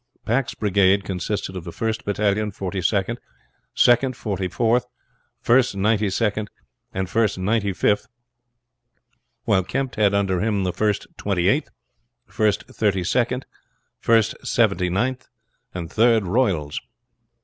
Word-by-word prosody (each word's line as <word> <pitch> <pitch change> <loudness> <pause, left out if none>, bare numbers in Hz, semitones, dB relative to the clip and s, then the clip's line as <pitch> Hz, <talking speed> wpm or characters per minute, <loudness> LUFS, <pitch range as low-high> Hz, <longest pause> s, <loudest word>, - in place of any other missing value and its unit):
Pack's 120 +3 0
brigade 100 -1 +3
consisted 95 +1 -3
of 90 - -5
the 85 - -7
first 110 +4 -3
battalion 105 +1 0
Forty 95 -1 -4
second, 100 +5 0 0.6
second 125 +1 +4
Forty 95 -5 -2
fourth, 120 +5 +1 0.5
first 120 -3 +3
Ninety 105 +1 +2
second, 105 +1 -1 0.4
and 95 0 -2
first 110 +1 +1
Ninety 100 +2 0
fifth, 105 +4 +1 1.4
while 95 - +2
Kempt 135 +5 -3
had 100 -2 +3
under 95 -2 +1
him 105 -2 0
the 90 -1 -1
first 105 -2 0
Twenty 95 -3 0
eighth, - - +2 0.6
first 105 -2 0
Thirty 100 -4 0
second, 125 +6 0 0.5
first 115 -2 +3
Seventy 90 0 +1
ninth, 125 +8 -1 0.4
and 85 -2 -6
Third 115 -1 +4
Royals. 90 - 0
105 Hz, 125 wpm, -22 LUFS, 95-115 Hz, 1.4 s, second